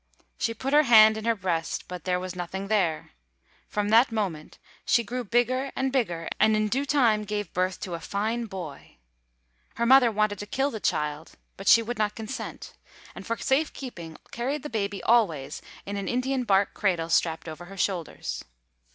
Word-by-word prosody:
She 230 Hz, -, -1 dB
put 270 Hz, +5 st, -3 dB
her 300 Hz, -, +7 dB
hand 220 Hz, -1 st, +8 dB
in 220 Hz, 0 st, -6 dB
her 230 Hz, 0 st, +2 dB
breast, 175 Hz, -5 st, -2 dB
but 180 Hz, -3 st, -8 dB
there 180 Hz, -1 st, +1 dB
was 185 Hz, 0 st, -6 dB
nothing 190 Hz, +2 st, -5 dB
there. 175 Hz, -8 st, 0 dB, 0.6 s
From 210 Hz, 0 st, -1 dB
that 230 Hz, +3 st, +5 dB
moment 190 Hz, -9 st, -3 dB, 0.3 s
she 235 Hz, -, +3 dB
grew 245 Hz, +3 st, -4 dB
bigger 245 Hz, +4 st, +1 dB
and 265 Hz, 0 st, 0 dB
bigger, 175 Hz, -11 st, -1 dB
and 215 Hz, +1 st, +4 dB
in 215 Hz, 0 st, +1 dB
due 275 Hz, +5 st, -1 dB
time 235 Hz, -7 st, +3 dB
gave 205 Hz, -3 st, -4 dB
birth 185 Hz, 0 st, 0 dB
to 180 Hz, -, -5 dB
a 170 Hz, -, -3 dB
fine 220 Hz, +6 st, -2 dB
boy. 180 Hz, -8 st, -9 dB, 0.8 s
Her 235 Hz, -, 0 dB
mother 255 Hz, -1 st, +6 dB
wanted 215 Hz, -2 st, 0 dB
to 205 Hz, -, -6 dB
kill 270 Hz, +6 st, 0 dB
the 220 Hz, -, -5 dB
child; 150 Hz, -3 st, -2 dB, 0.2 s
but 195 Hz, -, -9 dB
she 230 Hz, -, +7 dB
would 240 Hz, 0 st, -5 dB
not 210 Hz, -1 st, 0 dB
consent, 225 Hz, +4 st, -7 dB, 0.4 s
and, -, -, -10 dB
for 230 Hz, -, -1 dB
safe 295 Hz, +4 st, +1 dB
keeping, 170 Hz, -, -8 dB
carried 265 Hz, +5 st, -3 dB
the 295 Hz, -, -6 dB
baby 200 Hz, -3 st, -2 dB
always 185 Hz, -, +2 dB, 0.2 s
in 200 Hz, +1 st, -4 dB
an 200 Hz, -, -4 dB
Indian 255 Hz, +1 st, -1 dB
bark 195 Hz, -2 st, +2 dB
cradle 175 Hz, -5 st, 0 dB
strapped 165 Hz, 0 st, +1 dB
over 160 Hz, +2 st, -8 dB
her 195 Hz, +2 st, -11 dB
shoulders. 170 Hz, -, -3 dB
210 Hz, 185 wpm, -26 LUFS, 180-235 Hz, 0.8 s, hand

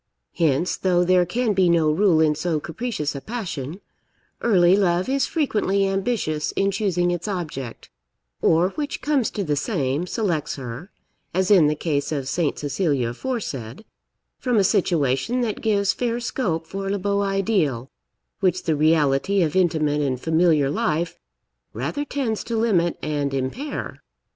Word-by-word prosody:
Hence, 160 Hz, +2 st, +1 dB
though 180 Hz, -2 st, +2 dB
there 180 Hz, 0 st, +3 dB
can 230 Hz, +4 st, 0 dB
be 185 Hz, -2 st, +3 dB
no 165 Hz, -3 st, +3 dB
rule 175 Hz, 0 st, +3 dB
in 155 Hz, -1 st, +4 dB
so 155 Hz, +1 st, -1 dB
capricious 165 Hz, -2 st, -3 dB
a 140 Hz, -, -6 dB
passion, 185 Hz, -, -5 dB, 0.6 s
early 185 Hz, -5 st, +5 dB
love 180 Hz, -2 st, +1 dB
is 270 Hz, 0 st, +1 dB
frequently 210 Hz, -, +1 dB
ambitious 195 Hz, -6 st, -1 dB
in 195 Hz, 0 st, +1 dB
choosing 185 Hz, -3 st, 0 dB
its 175 Hz, +2 st, -3 dB
object; 155 Hz, -, -5 dB, 0.5 s
or, 170 Hz, +3 st, +3 dB
which 290 Hz, +6 st, -5 dB
comes 285 Hz, -6 st, +1 dB
to 205 Hz, -, -3 dB
the 150 Hz, -4 st, 0 dB
same, 145 Hz, -, -1 dB
selects 180 Hz, -8 st, -1 dB
her 135 Hz, +6 st, -7 dB, 0.5 s
(as 190 Hz, +2 st, +1 dB
in 175 Hz, -7 st, +7 dB
the 150 Hz, -, +1 dB
case 150 Hz, -2 st, -1 dB
of 140 Hz, -4 st, -2 dB
Saint 155 Hz, +1 st, 0 dB
Cecilia 145 Hz, -4 st, 0 dB
aforesaid) 135 Hz, -, -5 dB, 0.5 s
from 245 Hz, -3 st, 0 dB
a 200 Hz, -, +5 dB
situation 175 Hz, -, +1 dB
that 225 Hz, -4 st, -2 dB
gives 200 Hz, -3 st, +2 dB
fair 240 Hz, -1 st, -1 dB
scope 185 Hz, -9 st, -2 dB
for 195 Hz, +3 st, -5 dB
le 200 Hz, -, 0 dB
beau 200 Hz, +1 st, 0 dB
ideal, 195 Hz, -, 0 dB, 0.5 s
which 185 Hz, -1 st, +1 dB
the 160 Hz, -3 st, +1 dB
reality 155 Hz, +4 st, +2 dB
of 155 Hz, 0 st, -1 dB
intimate 155 Hz, -5 st, +2 dB
and 130 Hz, -3 st, -1 dB
familiar 160 Hz, -2 st, +2 dB
life 160 Hz, +3 st, -1 dB, 0.5 s
rather 290 Hz, -, -3 dB
tends 260 Hz, -7 st, -2 dB
to 230 Hz, -1 st, -2 dB
limit 190 Hz, -7 st, +2 dB
and 145 Hz, -2 st, -1 dB
impair. 135 Hz, -, -4 dB
175 Hz, 155 wpm, -23 LUFS, 150-205 Hz, 0.6 s, in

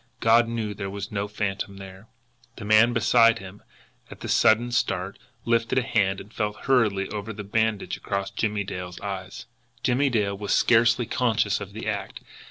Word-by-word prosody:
God 115 Hz, +1 st, +4 dB
knew 115 Hz, -3 st, -3 dB
there 100 Hz, 0 st, -5 dB
was 100 Hz, 0 st, -6 dB
no 100 Hz, 0 st, -2 dB
phantom 100 Hz, -1 st, -4 dB
there! 95 Hz, +2 st, -11 dB, 0.5 s
The 100 Hz, -, -8 dB
man 110 Hz, +3 st, +5 dB
beside 115 Hz, -1 st, +4 dB
him, 95 Hz, -1 st, -11 dB, 0.5 s
at -, -, -12 dB
the -, -, -5 dB
sudden 120 Hz, +3 st, +3 dB
start, 95 Hz, -5 st, -1 dB, 0.3 s
lifted 115 Hz, +1 st, +1 dB
a 130 Hz, -, +3 dB
hand 95 Hz, -4 st, +1 dB
and 105 Hz, -, -12 dB
felt 105 Hz, -2 st, -3 dB
hurriedly 105 Hz, -7 st, +2 dB
over 105 Hz, +1 st, -5 dB
the 105 Hz, -1 st, -7 dB
bandage 110 Hz, +1 st, -1 dB
across 100 Hz, -1 st, -3 dB
Jimmie 105 Hz, 0 st, -1 dB
Dale's 90 Hz, -2 st, -7 dB
eyes. 95 Hz, -2 st, -6 dB, 0.4 s
Jimmie 135 Hz, +3 st, +2 dB
Dale 105 Hz, -5 st, 0 dB
was 100 Hz, +1 st, -2 dB
scarcely 115 Hz, +1 st, +4 dB
conscious 110 Hz, -4 st, 0 dB
of 100 Hz, -, -8 dB
the 110 Hz, +1 st, -6 dB
act. 100 Hz, -3 st, -4 dB
105 Hz, 175 wpm, -25 LUFS, 100-115 Hz, 0.5 s, man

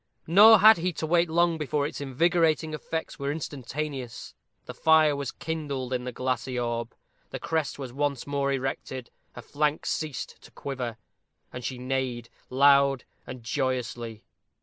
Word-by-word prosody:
Nor 210 Hz, +6 st, +8 dB
had 220 Hz, +2 st, +9 dB
he 180 Hz, +2 st, -1 dB
to 160 Hz, -, -3 dB
wait 170 Hz, +1 st, +2 dB
long 170 Hz, 0 st, +2 dB
before 150 Hz, -1 st, -1 dB
its 145 Hz, -, -5 dB
invigorating 160 Hz, +3 st, +1 dB
effects 160 Hz, +1 st, -5 dB
were 140 Hz, 0 st, -1 dB
instantaneous. 140 Hz, -3 st, -5 dB, 0.3 s
The -, -, -7 dB
fire 160 Hz, -2 st, +4 dB
was 140 Hz, -3 st, -4 dB
kindled 140 Hz, -5 st, -4 dB
in 125 Hz, 0 st, -2 dB
the 125 Hz, -, -3 dB
glassy 130 Hz, 0 st, -2 dB
orb; 120 Hz, -1 st, -3 dB, 0.4 s
her -, -, -4 dB
crest 160 Hz, -3 st, -2 dB
was 130 Hz, -4 st, -7 dB
once 140 Hz, -2 st, -1 dB
more 140 Hz, -1 st, -1 dB
erected; 130 Hz, -1 st, -4 dB, 0.2 s
her 125 Hz, -, -9 dB
flank 150 Hz, +2 st, -1 dB
ceased 155 Hz, -4 st, -4 dB
to -, -, -15 dB
quiver; 125 Hz, -5 st, -5 dB, 0.6 s
and 125 Hz, -, -7 dB
she 130 Hz, -, -4 dB
neighed 125 Hz, -2 st, -3 dB, 0.2 s
loud 140 Hz, -1 st, +4 dB, 0.2 s
and 125 Hz, -2 st, -8 dB
joyously. 120 Hz, -3 st, -3 dB
140 Hz, 150 wpm, -27 LUFS, 125-155 Hz, 0.6 s, had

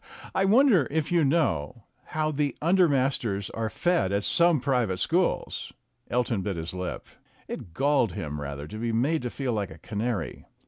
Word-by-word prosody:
Ah! -, -, -13 dB
I 190 Hz, -, +2 dB
wonder 215 Hz, -, +5 dB
if 155 Hz, +1 st, -1 dB
you 170 Hz, -2 st, +4 dB
know 125 Hz, -, 0 dB, 0.2 s
how 155 Hz, 0 st, -1 dB
the 145 Hz, -1 st, -1 dB
under 175 Hz, +2 st, +4 dB
masters 125 Hz, -8 st, 0 dB
are 115 Hz, -1 st, -2 dB
fed 175 Hz, -, +1 dB
at 100 Hz, 0 st, 0 dB
some 170 Hz, +2 st, +4 dB
private 125 Hz, -8 st, 0 dB
schools?" 175 Hz, -, 0 dB, 0.4 s
Elton 120 Hz, -4 st, 0 dB
bit 95 Hz, 0 st, -2 dB
his 80 Hz, +1 st, -5 dB
lip. 90 Hz, -1 st, -4 dB, 0.4 s
It 85 Hz, -, -7 dB
galled 135 Hz, -, +2 dB
him 75 Hz, -3 st, -4 dB
rather 70 Hz, 0 st, -5 dB
to 110 Hz, -, -7 dB
be 115 Hz, 0 st, -1 dB
made 135 Hz, +8 st, +1 dB
to 125 Hz, -, -3 dB
feel 130 Hz, -1 st, -2 dB
like 105 Hz, -3 st, -2 dB
a 80 Hz, -, -11 dB
canary. 105 Hz, 0 st, -4 dB
125 Hz, 180 wpm, -27 LUFS, 100-155 Hz, 0.4 s, wonder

